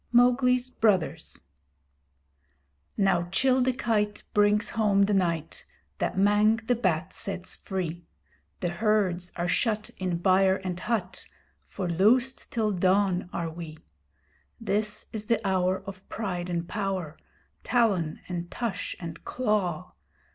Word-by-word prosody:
MOWGLI'S 250 +1 +4
BROTHERS 200 -9 0 1.5
Now 190 -4 +2
Chil 260 +5 +3
the 260 +1 +3
Kite 210 -4 -1
brings 210 +1 +3
home 210 -3 +3
the 205 +1 +2
night 170 -5 -1 0.4
That - - -1
Mang 205 +2 +4
the 245 - +3
Bat 185 -6 0
sets 195 -4 -4
free 175 -3 -4 0.5
The 175 - 0
herds 185 -2 0
are 175 0 -1
shut 215 +1 0
in 185 -2 -1
byre 190 +2 +3
and 180 -1 -3
hut 190 -4 -3 0.4
For 185 - -5
loosed 235 +10 +2
till 220 -3 +1
dawn 185 -1 +2
are 165 -1 -3
we. 160 -1 -8 0.8
This 210 -1 -1
is 215 -1 -5
the 230 -2 +2
hour 185 0 +1
of 195 -1 -10
pride 180 -5 -3
and 170 -1 -2
power, 190 -6 -3 0.5
Talon 200 -10 +1
and 175 -1 -4
tush 235 -4 -3
and 165 -2 -7
claw. 210 -9 -1
195 Hz, 125 wpm, -27 LUFS, 180-215 Hz, 1.5 s, MOWGLI'S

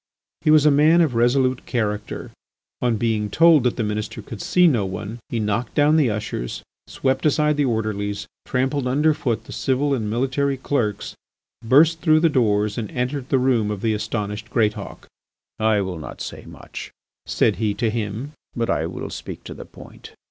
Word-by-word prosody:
He - - +1
was 155 -1 +6
a 150 - +6
man 155 +4 +5
of 155 -6 +2
resolute 130 +2 +2
character. 105 -4 -3 0.5
On 120 -2 +1
being 110 -2 0
told 160 +4 +5
that 125 - +2
the 115 - -1
Minister 105 0 -4
could 110 - -8
see 180 0 +3
no 125 -11 +3
one 105 +4 -5
he 115 - -2
knocked 110 +3 -2
down 150 +1 +4
the 150 -6 +3
ushers, 105 - -4 0.2
swept 130 0 -1
aside 150 0 +2
the 145 -1 +1
orderlies, 105 -4 -2 0.2
trampled 130 +1 -1
under 150 +5 +3
foot 130 -7 -2
the - - -12
civil 140 +2 0
and 110 -5 -1
military 135 +4 0
clerks, 115 -6 -2 0.5
burst 155 +7 +4
through 155 -2 +4
the 165 - +4
doors, 105 -5 +1
and 110 -3 -4
entered 125 +1 -3
the 135 - +3
room 125 -5 +2
of 105 -2 -4
the 110 0 +1
astonished 105 0 -4
Greatauk. 110 -3 -1 0.5
"I 110 -1 +2
will 95 -4 -4
not 75 - -9
say - - -7
much," - - -9 0.4
said - - +1
he 105 -3 0
to 115 -2 0
him, 110 +5 -4 0.2
"but 115 -1 0
I - - 0
will - - -6
speak - - -7
to - - -8
the - - -10
point. - - -14
120 Hz, 185 wpm, -22 LUFS, 105-140 Hz, 0.5 s, was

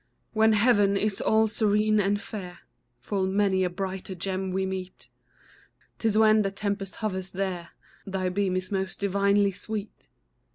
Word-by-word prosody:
When 220 0 +4
heaven 205 -3 +4
is 210 -1 -1
all 220 0 +3
serene 215 0 +2
and 205 0 +1
fair, 185 -5 -8 0.4
Full 190 - -1
many 190 -1 +2
a 180 - +1
brighter 190 +1 -5
gem 190 +1 -3
we 190 +1 0
meet; 190 -1 -6 0.9
'Tis 220 -2 +1
when 215 0 +6
the 195 - 0
tempest 200 0 -4
hovers 190 -4 -3
there, 185 -3 -3 0.4
Thy 190 -1 -1
beam 190 0 0
is 185 +1 -3
most 190 -1 -2
divinely 200 0 +2
sweet. 210 +2 -7
195 Hz, 150 wpm, -27 LUFS, 190-210 Hz, 0.9 s, when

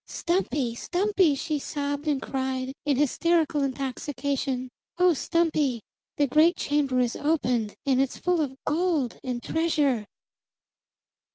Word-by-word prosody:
"Stumpy! 295 -9 -1
Stumpy!" 365 - +1
she 300 +2 -2
sobbed 285 +1 -3
and 290 -3 +1
cried 265 -1 -3
in 280 -3 +3
hysterical 310 +1 +2
intoxication. 270 0 -2 0.3
"Oh, 360 0 +5
Stumpy, 310 -5 +1 0.4
the 290 - +4
great 310 +6 +4
chamber 285 -5 0
is 245 -2 +1
open, 250 -8 0 0.2
and 265 -1 +3
it's 270 - -1
full 360 -2 +1
of 270 -3 -2
gold 310 -5 0
and 250 -2 -3
treasure!" 295 -9 +1
285 Hz, 120 wpm, -26 LUFS, 260-320 Hz, 0.4 s, Oh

